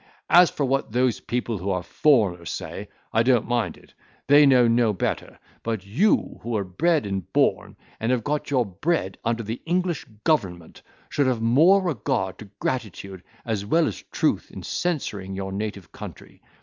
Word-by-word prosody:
As 175 0 +8
for 145 - -2
what 135 -4 -1
those 125 -1 +2
people 120 -2 -3
who 95 +3 -3
are 90 -2 -1
foreigners 95 - +2
say, 95 +4 -6 0.2
I 110 - +4
don't 125 -1 +3
mind 120 -1 -1
it; - - -21 0.3
they 145 +1 +7
know 125 -3 +5
no 115 -2 +3
better; 95 - -3 0.2
but 110 -4 -3
you 155 - +1
who 120 - -7
were 110 -4 0
bred 150 - +1
and 95 -3 -4
born, - - +1 0.2
and 115 +2 0
have 125 -3 +1
got 150 +3 -2
your 130 -4 +2
bread, 100 - -2
under 115 0 -1
the 110 +3 -5
English 175 -1 -1 0.2
government, 90 - -1 0.3
should 140 -2 +1
have 120 -3 0
more 165 +12 +5
regard 105 - -2
to 105 - -10
gratitude, 100 -6 -4 0.2
as 110 -4 -2
well 160 +11 +2
as 105 - -5
truth - - 0
in - - -9
censuring 105 - -3
your 95 0 -4
native 100 -2 -5
country. - - -11
115 Hz, 175 wpm, -24 LUFS, 100-140 Hz, 0.3 s, As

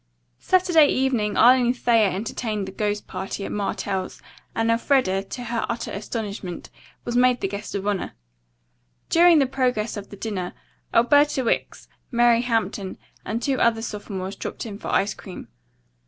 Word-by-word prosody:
Saturday 355 -5 +4
evening 250 -7 0
Arline 245 +1 +5
Thayer 230 -4 +3
entertained 210 +1 -3
the - - -6
ghost 205 +1 -2
party 190 +1 -5
at - - -5
Martell's, 195 -2 -3 0.4
and 225 0 +2
Elfreda, 230 -5 +2
to 245 +5 -7
her 235 -1 -2
utter 235 0 -3
astonishment, 200 -3 -5 0.3
was 240 - -3
made 250 0 +4
the - - -1
guest 200 +2 -6
of 200 0 -3
honor. 205 -3 -2 1.0
During 340 0 +6
the 280 - +4
progress 250 -5 -1
of 200 -1 -8
the 205 - -10
dinner, 195 -4 -4 0.4
Alberta 285 +3 +4
Wicks, 230 - -2 0.2
Mary 240 -1 +4
Hampton 225 -5 -2 0.3
and 225 +3 -2
two 275 -2 0
other 225 -1 +2
sophomores 200 -3 -5
dropped - - -6
in 205 -2 -7
for - - -7
ice 200 +2 +1
cream. 190 - -10
225 Hz, 155 wpm, -23 LUFS, 200-245 Hz, 1.0 s, During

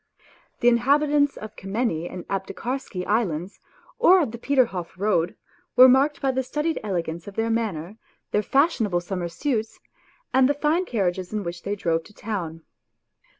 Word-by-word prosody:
The 240 - +3
inhabitants 285 +4 +3
of 215 0 -9
Kamenny 195 -5 -2
and 180 - -8
Aptekarsky 195 0 -4
Islands 195 -5 -1 0.4
or 370 +2 +7
of 235 - -3
the 235 - -8
Peterhof 230 -11 0
Road 185 -4 +1 0.4
were 255 +1 +10
marked 275 +3 +4
by 270 - +1
the 260 0 0
studied 300 +5 -2
elegance 170 -4 -3
of 200 - -9
their 225 0 0
manner, 210 -4 -2 0.3
their 210 - +2
fashionable 225 - +2
summer 175 -1 -3
suits, 220 - -2 0.5
and 265 0 +5
the 290 - +2
fine 310 +5 +1
carriages 185 - -1
in 210 -1 -1
which 170 -1 -5
they 200 +3 -2
drove 165 -4 0
to 210 - -17
town. 170 -7 -5
215 Hz, 155 wpm, -24 LUFS, 180-265 Hz, 0.5 s, were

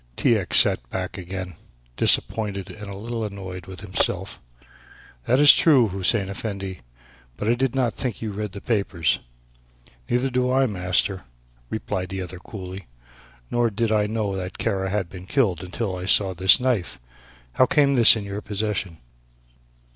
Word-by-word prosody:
T. 120 - +3
X. 95 -6 +2
sat - - +3
back 95 +3 -4
again, 90 0 -6 0.4
disappointed 100 - +1
and 105 -1 -9
a 100 - -7
little 115 +2 -4
annoyed 95 -4 -7
with 95 -1 -9
himself. 95 -3 -1 0.9
"That 125 - +3
is 145 -1 +10
true, 135 -9 +4
Hussein 95 +2 0
Effendi, 100 -3 -5 0.6
but 105 - -3
I 115 - +4
did 130 +1 -1
not 125 -4 +1
think 125 -6 -4
you 110 -2 -4
read 105 -1 -5
the 100 - -8
papers." 100 - 0 0.9
"Neither 125 +2 +1
do 125 0 +1
I, 135 +1 +3
master," 90 -2 -1 0.4
replied 95 -4 -3
the 95 0 -4
other 90 0 -8
coolly, 95 -1 -8 0.6
"nor 120 -1 +2
did 110 +1 -1
I 105 -1 +2
know 105 -2 -2
that 95 -1 -5
Kara 95 -4 -1
had 100 -2 -1
been 90 +1 -11
killed 95 - +1
until 95 +2 -3
I 90 0 -6
saw 100 -2 +4
this 95 +5 +5
knife. 125 -8 -1 0.5
How 130 - +4
came 140 0 +3
this 120 -4 +8
in 110 - -4
your 100 +1 -5
possession!" 100 -4 -3
100 Hz, 160 wpm, -23 LUFS, 95-115 Hz, 0.9 s, is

